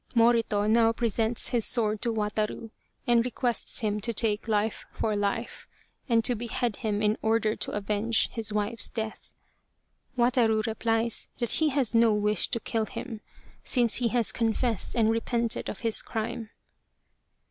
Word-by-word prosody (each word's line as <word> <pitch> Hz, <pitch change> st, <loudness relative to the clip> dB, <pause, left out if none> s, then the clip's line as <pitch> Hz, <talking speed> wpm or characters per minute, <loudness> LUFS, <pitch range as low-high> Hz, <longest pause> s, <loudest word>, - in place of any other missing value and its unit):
Morito 230 Hz, -3 st, +3 dB
now 225 Hz, +1 st, +4 dB
presents 230 Hz, 0 st, -1 dB
his 235 Hz, -2 st, +1 dB
sword 215 Hz, -3 st, 0 dB
to 235 Hz, -, 0 dB
Wataru 215 Hz, +1 st, -2 dB, 0.3 s
and 240 Hz, -1 st, +4 dB
re 250 Hz, -, -2 dB
quests 245 Hz, 0 st, -2 dB
him 210 Hz, -1 st, -1 dB
to 235 Hz, +3 st, -2 dB
take 215 Hz, -1 st, 0 dB
life 215 Hz, 0 st, 0 dB
for 215 Hz, -1 st, -1 dB
life, 205 Hz, +3 st, -3 dB, 0.4 s
and 230 Hz, -1 st, +3 dB
to 245 Hz, -, +4 dB
behead 235 Hz, 0 st, -2 dB
him 215 Hz, -2 st, -2 dB
in 210 Hz, +1 st, +1 dB
order 220 Hz, -1 st, +1 dB
to -, -, -4 dB
avenge 210 Hz, +2 st, 0 dB
his 225 Hz, -2 st, 0 dB
wife's 210 Hz, +2 st, +1 dB
death. 220 Hz, -1 st, -6 dB, 0.9 s
Wataru 235 Hz, -3 st, +2 dB
replies 225 Hz, 0 st, 0 dB
that 240 Hz, -2 st, -1 dB
he 315 Hz, -1 st, +2 dB
has 265 Hz, -5 st, +1 dB
no 230 Hz, -2 st, +4 dB
wish 210 Hz, -1 st, +1 dB
to 230 Hz, -, -2 dB
kill 220 Hz, -1 st, -2 dB
him, 230 Hz, -4 st, -7 dB, 0.4 s
since 240 Hz, -4 st, +2 dB
he 240 Hz, -, +1 dB
has 235 Hz, -1 st, +1 dB
confessed 230 Hz, -1 st, -1 dB
and 225 Hz, -2 st, +3 dB
repented 230 Hz, 0 st, 0 dB
of -, -, -7 dB
his 225 Hz, -2 st, +1 dB
crime. 225 Hz, 0 st, -4 dB
225 Hz, 160 wpm, -27 LUFS, 215-235 Hz, 0.9 s, now